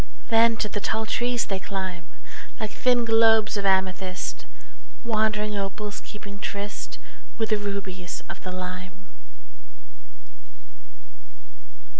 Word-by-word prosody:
Then 230 0 +6
to 210 - +1
the 205 - -2
tall 220 +2 0
trees 240 +2 +1
they 195 -1 -1
climb, 190 -3 -4 0.5
Like 215 -1 -2
thin 245 -2 +3
globes 225 -1 +5
of 200 -1 +1
amethyst, 190 -1 0 0.6
Wandering 215 -2 +1
opals 205 +1 -3
keeping 200 -1 -9
tryst 205 +1 -4 0.4
With 225 -1 0
the 215 - +3
rubies 195 -3 -4
of - - -7
the 185 - -5
lime. 185 +2 -6
205 Hz, 110 wpm, -26 LUFS, 190-220 Hz, 0.6 s, Then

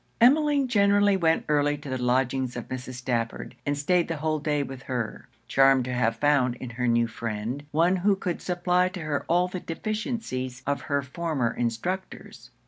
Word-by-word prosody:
Emmeline 285 +2 +4
generally 205 -3 +4
went 165 -3 +2
early 145 0 +2
to 145 - -11
the 130 -1 -3
lodgings 125 0 +1
of 120 - -6
Mrs. 130 0 -6
Stafford, 120 -2 -3
and 145 0 0
stayed 170 +4 +2
the 165 - -3
whole 155 +1 -1
day 150 -1 0
with 135 -2 -8
her; 125 -5 -4 0.2
charmed 135 -2 +4
to 125 - -3
have 125 -2 +1
found 130 -2 +2
in 125 0 -7
her 125 +1 -2
new 120 0 +3
friend, 115 +3 -4
one 170 +5 +3
who 195 +2 +3
could 185 -2 -3
supply 180 0 +1
to 185 -1 -7
her 150 -2 -2
all 175 +2 +3
the 185 0 -5
deficiencies 170 - -4
of 145 0 -1
her 140 -1 -1
former 140 -3 -2
instructors. 120 +12 -4
145 Hz, 180 wpm, -26 LUFS, 125-180 Hz, 0.2 s, Emmeline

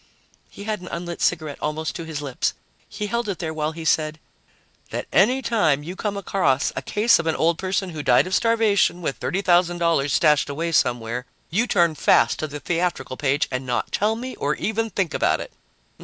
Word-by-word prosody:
He 200 - -10
had 215 0 -2
an 180 - -9
unlit 170 0 -5
cigarette 155 -3 0
almost 155 +1 -2
to 165 - -5
his 155 -2 -5
lips. 135 -3 -1 0.3
He 210 - -4
held 235 +1 -2
it 195 - -2
there 160 -3 -4
while 155 0 -1
he 160 0 -8
said: 155 0 +1 0.7
"That - - -4
any 250 +8 +4
time 205 -12 +2
you 175 +4 -6
come 205 0 -3
across 180 -9 +1
a - - -2
case 220 0 +3
of 165 - -3
an 160 - +1
old 165 0 +1
person 190 0 -1
who 155 -2 -5
died 145 - +4
of 185 - -5
starvation 210 -5 +2
with 140 - -2
$30,000 175 -5 +2
stashed 150 0 +3
away 165 +4 -2
somewhere, 120 -3 0 0.2
you 220 +8 +1
turn 170 -6 +3
fast 150 - +3
to 155 - -2
the 150 0 -7
theatrical 165 -5 -2
page 140 +1 +1
and 130 0 -2
not 125 -2 -2
tell 215 +2 +1
me 255 +3 -6
or 145 +1 0
even 225 +5 -1
think 190 -4 -1
about - - +2
it." - - -8
170 Hz, 200 wpm, -23 LUFS, 150-200 Hz, 0.7 s, any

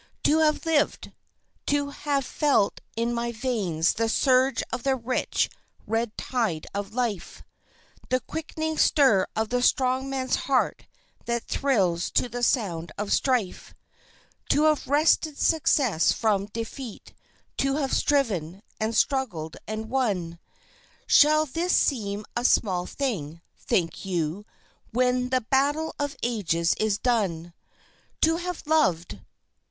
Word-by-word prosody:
To 310 +2 +4
have 310 +1 +2
lived! 320 -3 0 0.6
To 285 0 0
have 280 -2 -1
felt 280 -10 +1
in 230 +1 -1
my 235 0 -2
veins 210 -9 0
the 225 0 -1
surge 260 +2 +3
of 250 - -2
the 270 +1 +1
rich, 250 0 -1 0.4
red 225 0 -2
tide 220 -11 -2
of 200 +1 -5
life, 225 -8 -3 0.7
The 255 - +2
quickening 315 +4 -4
stir 260 -11 +4
of 220 0 -1
the 245 0 0
strong 260 +1 +2
man's 260 -1 -1
heart 265 -2 +1 0.4
that 235 -1 -1
thrills 190 -11 +1
to - - +2
the 245 +1 -6
sound 185 -10 0
of 205 0 -1
strife; 250 -8 -1 0.7
To 295 - +3
have 310 -1 +2
wrested 300 +1 +2
success 265 - +2
from 205 -3 0
defeat, 230 +2 -7 0.4
to 275 0 +1
have 280 -3 -1
striven, 200 - 0 0.2
and 220 +1 -1
struggled, 210 - 0
and 215 +1 -4
won 200 -10 -1 0.7
Shall 305 +1 +5
this 335 +6 -1
seem 210 -6 0
a 240 - -1
small 185 -7 +2
thing, 170 - -3 0.2
think 165 -3 -1
you, 180 +1 -3 0.4
when 250 +1 +1
the 255 0 +1
Battle 285 +6 +1
of 285 -1 -2
Ages 170 -8 +1
is 215 -2 +1
done? 185 -9 -1 0.7
To 325 +1 +3
have 355 0 -5
loved! 175 - +1
240 Hz, 130 wpm, -26 LUFS, 200-275 Hz, 0.7 s, Shall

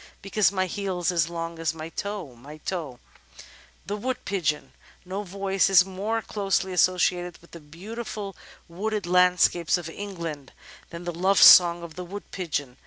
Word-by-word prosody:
Because 200 0 +2
my 190 -1 0
heel's 185 -2 -2
as 165 -2 +1
long 165 -1 -5
as 165 0 -1
my 160 0 -7
toe, 200 -6 -5
my 140 +6 -12
toe. 155 -6 -5 0.9
The 205 - -3
Wood 250 +5 -4
Pigeon 155 -9 -1 0.3
No 190 +3 -4
voice 195 0 0
is 190 -2 +6
more 205 +4 -3
closely 195 -2 -1
associated 180 -1 +1
with 170 - -22
the 170 - -10
beautiful 200 +6 -7 0.3
wooded 205 +4 -3
landscapes 180 -1 +3
of 165 -2 -7
England 170 -8 -7 0.4
than 170 +1 -8
the 175 0 -4
love 190 +4 +1
song 175 -1 +8
of 170 -2 -9
the 180 - -4
Wood 200 +3 -9
Pigeon. 145 -8 -4
180 Hz, 160 wpm, -25 LUFS, 165-195 Hz, 0.9 s, song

